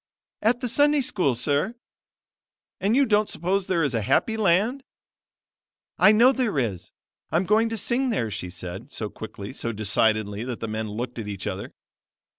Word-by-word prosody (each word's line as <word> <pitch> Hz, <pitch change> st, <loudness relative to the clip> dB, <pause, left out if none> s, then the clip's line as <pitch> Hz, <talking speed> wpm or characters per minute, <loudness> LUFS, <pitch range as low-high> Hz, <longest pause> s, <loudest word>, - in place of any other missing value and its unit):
"At 235 Hz, +3 st, +2 dB
the 250 Hz, -, -1 dB
Sunday 290 Hz, +4 st, +3 dB
School, 180 Hz, -, +1 dB
Sir." 145 Hz, -, 0 dB, 1.0 s
"And 205 Hz, +4 st, +1 dB
you 275 Hz, +1 st, +5 dB
don't 210 Hz, -2 st, +2 dB
suppose 185 Hz, +3 st, -1 dB
there 170 Hz, -3 st, +1 dB
is 140 Hz, -3 st, 0 dB
a 115 Hz, -, 0 dB
happy 135 Hz, -, +1 dB
land?" 215 Hz, +6 st, +2 dB, 1.2 s
"I 210 Hz, -, +7 dB
know 235 Hz, +4 st, +6 dB
there 250 Hz, -, -1 dB
is; 110 Hz, -9 st, -2 dB, 0.4 s
I'm 170 Hz, +3 st, +1 dB
going 220 Hz, +4 st, +3 dB
to 225 Hz, -, -3 dB
sing 250 Hz, +5 st, 0 dB
there," 115 Hz, -, -1 dB
she 90 Hz, -2 st, -5 dB
said, 90 Hz, +8 st, -7 dB
so 105 Hz, -5 st, -5 dB
quickly, 105 Hz, 0 st, -8 dB
so 115 Hz, -, -3 dB
decidedly 110 Hz, 0 st, +1 dB
that 125 Hz, -2 st, -5 dB
the 115 Hz, -, -4 dB
men 110 Hz, 0 st, -3 dB
looked 120 Hz, +3 st, -5 dB
at 110 Hz, -, -5 dB
each 100 Hz, -2 st, -5 dB
other. -, -, -5 dB
150 Hz, 175 wpm, -25 LUFS, -, 1.2 s, I